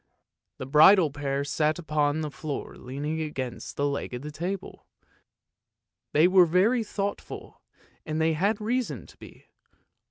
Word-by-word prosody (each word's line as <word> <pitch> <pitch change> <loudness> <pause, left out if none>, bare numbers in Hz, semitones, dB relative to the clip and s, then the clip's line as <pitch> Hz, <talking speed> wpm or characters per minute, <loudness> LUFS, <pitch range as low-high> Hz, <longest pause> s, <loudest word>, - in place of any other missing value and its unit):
The - - -6
bridal 155 +4 +6
pair 140 -1 -2
sat 150 +1 0
upon 155 -2 0
the 150 -1 -4
floor 145 0 -6
leaning 145 +5 -4
against 135 -5 -5
the 145 - +1
leg 140 -3 -2
of 125 - -7
the 150 - -6
table; 180 +5 -5 1.2
they 155 +4 +5
were 185 -1 +6
very 205 +8 +3
thought 200 -1 -3
ful, - - -11 0.4
and 155 0 -3
they 160 0 +2
had 200 +7 +1
reason 240 +3 -2
to - - -18
be. - - -14
155 Hz, 150 wpm, -27 LUFS, 145-185 Hz, 1.2 s, bridal